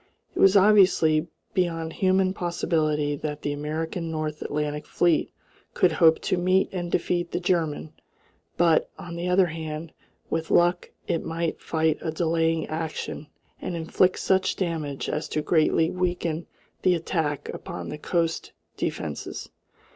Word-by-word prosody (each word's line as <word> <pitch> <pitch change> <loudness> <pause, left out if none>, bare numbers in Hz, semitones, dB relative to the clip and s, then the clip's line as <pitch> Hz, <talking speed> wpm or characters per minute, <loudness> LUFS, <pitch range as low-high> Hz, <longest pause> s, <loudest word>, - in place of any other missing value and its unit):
It - - -5
was 195 +1 +7
obviously 185 -6 +5 0.3
beyond 165 -4 -1
human 190 0 +2
possibility 155 -5 0
that 150 0 -5
the 145 - -1
American 160 +3 -3
North 155 -1 -3
Atlantic 150 0 -3
fleet 170 -2 +2 0.4
could 180 - +4
hope 160 0 +5
to 185 - 0
meet 185 +2 +3
and 175 -2 -3
defeat 175 0 0
the 175 - -2
German; 170 -4 -1 0.6
but, 165 -2 +3
on 170 -1 -7
the 170 +1 -3
other 180 +1 +4
hand, 160 -1 -5 0.3
with 160 0 -2
luck 175 +1 +3 0.2
it 165 - 0
might 165 0 -2
fight 160 -1 +1
a 165 - -2
delaying 165 0 +1
action 155 -1 -4 0.3
and 180 - -3
inflict 170 +3 +2
such 190 0 +1
damage 160 -6 -3
as 150 - -2
to 155 - -1
greatly 160 0 +3
weaken 175 -2 -2 0.3
the 180 -1 +4
attack 155 -4 -2
upon - - -6
the 150 - -6
coast 165 0 -1 0.2
defences. 75 - -4
165 Hz, 140 wpm, -26 LUFS, 155-175 Hz, 0.6 s, was